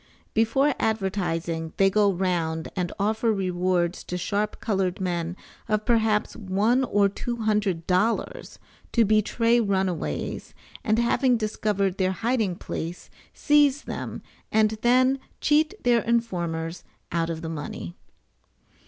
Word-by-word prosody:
] -, -, -36 dB
Before 270 Hz, +6 st, +3 dB
advertising 175 Hz, -6 st, -1 dB
they 195 Hz, 0 st, +4 dB
go 205 Hz, 0 st, +4 dB
round 170 Hz, -3 st, -1 dB
and 180 Hz, -3 st, -2 dB
offer 220 Hz, +3 st, +1 dB
rewards 180 Hz, -2 st, 0 dB
to 180 Hz, -, -4 dB
sharp 205 Hz, +4 st, -2 dB
colored 195 Hz, -4 st, -1 dB
men 175 Hz, -1 st, -2 dB, 0.3 s
of 215 Hz, 0 st, 0 dB
perhaps 220 Hz, -3 st, +2 dB
one 215 Hz, +6 st, +1 dB
or 205 Hz, -4 st, +3 dB
two 240 Hz, +4 st, -4 dB
hundred 205 Hz, -6 st, 0 dB
dollars, 200 Hz, +5 st, 0 dB, 0.4 s
to 230 Hz, -2 st, +4 dB
betray 230 Hz, +3 st, +3 dB
runaways, 190 Hz, -, -2 dB, 0.3 s
and 215 Hz, -, +2 dB
having 245 Hz, +1 st, +3 dB
discovered 210 Hz, -3 st, -1 dB
their 185 Hz, 0 st, +2 dB
hiding 225 Hz, -3 st, 0 dB
place, 170 Hz, +1 st, -6 dB, 0.2 s
seize 290 Hz, -1 st, +3 dB
them -, -, -6 dB, 0.3 s
and 215 Hz, 0 st, +3 dB
then 255 Hz, +2 st, +4 dB, 0.2 s
cheat 305 Hz, +5 st, +2 dB
their 240 Hz, -1 st, +4 dB
informers 175 Hz, -8 st, -2 dB, 0.3 s
out 165 Hz, -1 st, 0 dB
of 165 Hz, 0 st, -4 dB
the -, -, -3 dB
money. 145 Hz, -, -6 dB
200 Hz, 125 wpm, -25 LUFS, 180-230 Hz, 0.4 s, they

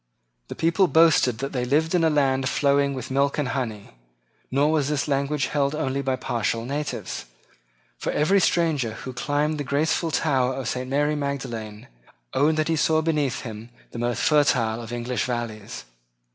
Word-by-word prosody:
The -, -, -7 dB
people 170 Hz, +4 st, +2 dB
boasted 160 Hz, -8 st, +4 dB
that 135 Hz, +4 st, -4 dB
they 125 Hz, -3 st, -2 dB
lived 150 Hz, +6 st, +1 dB
in 175 Hz, -2 st, +3 dB
a 160 Hz, -, +4 dB
land 135 Hz, -3 st, +1 dB
flowing 140 Hz, -1 st, +2 dB
with 130 Hz, 0 st, -6 dB
milk 140 Hz, +1 st, +1 dB
and 145 Hz, -4 st, -1 dB
honey. 115 Hz, -7 st, -4 dB, 0.6 s
Nor 140 Hz, +3 st, +2 dB
was 150 Hz, -3 st, +1 dB
this 145 Hz, -4 st, -1 dB
language 140 Hz, +1 st, 0 dB
held 140 Hz, 0 st, 0 dB
only 140 Hz, -3 st, -1 dB
by 135 Hz, -1 st, 0 dB
partial 115 Hz, -2 st, -2 dB
natives; 145 Hz, +3 st, -4 dB, 0.7 s
for -, -, -2 dB
every 190 Hz, +7 st, +3 dB
stranger 155 Hz, -12 st, +1 dB
who 130 Hz, +3 st, -7 dB
climbed 145 Hz, +4 st, -1 dB
the -, -, -1 dB
graceful 155 Hz, +4 st, 0 dB
tower 130 Hz, -5 st, +1 dB
of 135 Hz, -4 st, -4 dB
St. 125 Hz, +1 st, -3 dB
Mary 145 Hz, +2 st, +1 dB
Magdalene 125 Hz, -7 st, -5 dB, 0.5 s
owned 155 Hz, +3 st, +2 dB
that 155 Hz, -, +1 dB
he 165 Hz, -, +1 dB
saw 160 Hz, 0 st, +2 dB
beneath 150 Hz, -5 st, 0 dB
him 110 Hz, -1 st, -8 dB, 0.2 s
the 120 Hz, -, -7 dB
most 120 Hz, 0 st, -1 dB
fertile 120 Hz, -7 st, +2 dB
of 115 Hz, 0 st, -8 dB
English 120 Hz, +1 st, -2 dB
valleys. 115 Hz, -, -5 dB
140 Hz, 170 wpm, -24 LUFS, 125-150 Hz, 0.7 s, boasted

